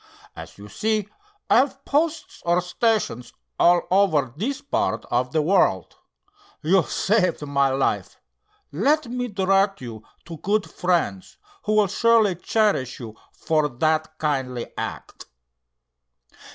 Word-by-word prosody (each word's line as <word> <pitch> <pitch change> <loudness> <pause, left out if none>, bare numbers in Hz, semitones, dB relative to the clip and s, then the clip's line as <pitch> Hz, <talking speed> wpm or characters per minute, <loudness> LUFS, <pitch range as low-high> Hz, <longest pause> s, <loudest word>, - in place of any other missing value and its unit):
"As - - -10
you 100 +1 -11
see, 215 - -1 0.4
I - - +4
have 270 +1 +1
posts 315 +3 -1
or 175 +1 +2
stations 180 - -1 0.3
all 175 0 +5
over 160 -10 +2
this 260 - -3
part 285 - -2
of 125 +1 0
the 155 0 +1
world. 155 - +1 0.7
You 180 +5 +4
saved 185 -3 0
my 140 -1 +2
life. 135 +1 -1 0.5
Let 300 -1 +1
me 245 +1 -3
direct 195 -1 +1
you 115 -4 -8 0.2
to 165 -1 -8
good 205 +6 0
friends, 170 - -2 0.3
who 215 - +1
will 210 -1 +4
surely 220 0 +3
cherish 195 - 0
you 110 -3 -9 0.2
for 155 -2 0
that 155 +4 -1
kindly 130 -6 -2
act." - - -7
180 Hz, 125 wpm, -23 LUFS, 140-215 Hz, 0.7 s, all